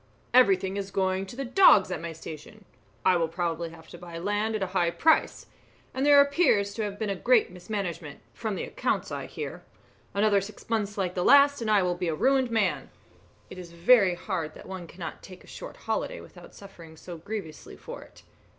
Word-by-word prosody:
"Everything 195 -5 +4
is 200 -1 -4
going 190 0 -1
to 215 - -10
the 275 +2 -4
dogs 240 - +5
at 175 - -3
my 170 0 -5
station. 160 +6 -11 0.4
I 185 - +5
will 165 -1 0
probably 170 0 -3
have 165 0 -15
to 175 - -11
buy 170 -1 -9
land 205 +5 -1
at 210 - -1
a 185 - -5
high 170 -1 +2
price; 305 - +2 0.5
and 265 - -2
there 285 0 +7
appears 280 - +3
to 225 - -4
have 205 -1 -4
been 205 -2 -2
great 240 -6 +3
mismanagement, 180 -5 -5
from 220 -3 -4
the - - -4
accounts - - -2
I - - -5
hear. - - -7 0.5
Another 205 -1 +3
six 205 +3 -11
months 210 -2 -1
like 185 -2 -1
the 180 - -1
last 285 +1 +6
and 225 - -2
I 205 -3 +4
will 180 -1 0
be 175 0 -3
a 160 - -1
ruined 265 - +2
man. 220 -5 0 0.6
It 185 - -9
is 170 -2 -10
very 185 +1 +4
hard 175 -5 -4
that - - -12
one 185 -2 -7
cannot 170 0 -8
take 185 -2 -13
a - - -19
short - - -9
holiday - - -3
without - - -14
suffering 170 -5 -13
so 170 0 -9
grievously 195 -4 -7
for - - -9
it. - - -17
195 Hz, 205 wpm, -27 LUFS, 175-220 Hz, 0.6 s, there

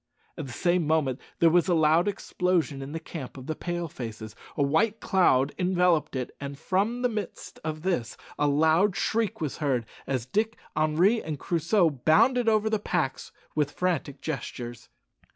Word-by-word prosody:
At - - -6
the - - -8
same 175 +2 +1
moment 150 -5 +1 0.2
there 165 -1 +5
was 175 +1 +3
a 175 - +3
loud 160 +3 +4
explosion 180 -7 0
in 135 +1 -6
the 165 - -4
camp 155 -5 -8
of 130 - -9
the 155 - -2
Pale 175 +1 -4
faces, 110 -4 -7 0.2
a 145 - +3
white 205 +11 +2
cloud 145 -10 +3
enveloped 180 -5 +2
it, 125 -1 -4
and 140 0 -5
from 205 - 0
the - - +5
midst 215 -6 -6
of 155 0 -4
this 175 -12 -1 0.2
a 145 - +3
loud 160 +7 +3
shriek 220 -3 0
was 150 -4 -2
heard, 135 -6 0 0.2
as 130 -4 -1
Dick, 220 - -1 0.2
Henri, 160 +9 +3
and 155 -2 -4
Crusoe 170 +3 +2
bounded 225 - +3
over 215 0 +2
the 220 -1 +1
packs 175 -9 -2 0.2
with 150 -2 +1
frantic 155 -5 -2
gestures. 120 -5 -6
160 Hz, 170 wpm, -27 LUFS, 140-185 Hz, 0.2 s, there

